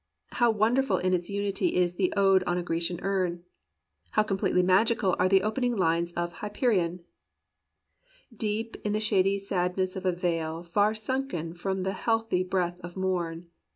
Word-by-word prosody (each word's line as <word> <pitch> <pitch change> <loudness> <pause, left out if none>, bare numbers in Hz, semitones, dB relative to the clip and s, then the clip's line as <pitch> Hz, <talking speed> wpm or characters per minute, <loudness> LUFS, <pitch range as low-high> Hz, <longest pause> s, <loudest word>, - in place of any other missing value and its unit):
How 240 -1 +3
wonderful 230 +5 +2
in 185 +1 0
its 175 -1 -1
unity 200 - -1
is 180 -1 +2
the 185 0 0
"Ode 195 -1 +5
on 175 - 0
a 175 - -2
Grecian 170 0 -2
Urn 180 -3 -1 0.3
"! 80 +2 -43
How 215 - +4
completely 195 -3 +1
magical 195 +1 +3
are 185 - +3
the 190 0 +4
opening 240 +3 0
lines 170 -2 +1
of 175 0 -3
"Hyperion": 205 -5 0 1.3
"Deep 220 +1 -3
in 210 - -1
the 215 - +1
shady 200 -2 +2
sadness 185 -1 -1
of 190 0 -3
a - - +4
vale 165 -2 -2
Far 205 +5 +1
sunken 215 -8 -3
from 190 +2 -3
the 190 +1 -1
healthy 225 -5 0
breath 180 -1 -1
of 175 +1 -9
morn. 175 -3 -2
185 Hz, 165 wpm, -28 LUFS, 175-210 Hz, 1.3 s, Ode